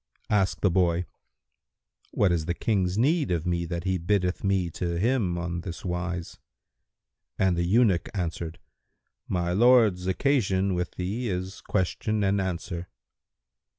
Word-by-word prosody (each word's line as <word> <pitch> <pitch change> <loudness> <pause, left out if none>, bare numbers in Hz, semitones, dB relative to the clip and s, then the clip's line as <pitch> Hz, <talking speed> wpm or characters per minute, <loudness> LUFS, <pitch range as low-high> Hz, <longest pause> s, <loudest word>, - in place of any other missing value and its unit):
Asked 100 -3 +1
the 100 - +3
boy, 90 -1 +2 1.0
"What 100 -3 +2
is 85 -3 0
the 85 +1 -1
King's 95 -3 0
need 145 +5 +2
of 85 -2 -1
me 85 -1 0
that 85 0 -3
he 95 -1 0
biddeth 90 +1 0
me 95 -3 +1
to 85 +1 -2
him 105 -4 +1
on 85 0 -3
this 90 +1 -7
wise?", 90 -1 -4 1.0
and 95 -2 +2
the 85 0 0
eunuch 100 -2 +3
answered, 85 -2 -3 0.7
"My 90 -1 -1
lord's 110 -4 +4
occasion 95 -4 +1
with 90 -1 -3
thee 105 +7 -2
is 95 +1 -4
question 105 +2 -1
and 100 0 +2
answer." 90 -1 -4
90 Hz, 140 wpm, -27 LUFS, 85-100 Hz, 1.0 s, lord's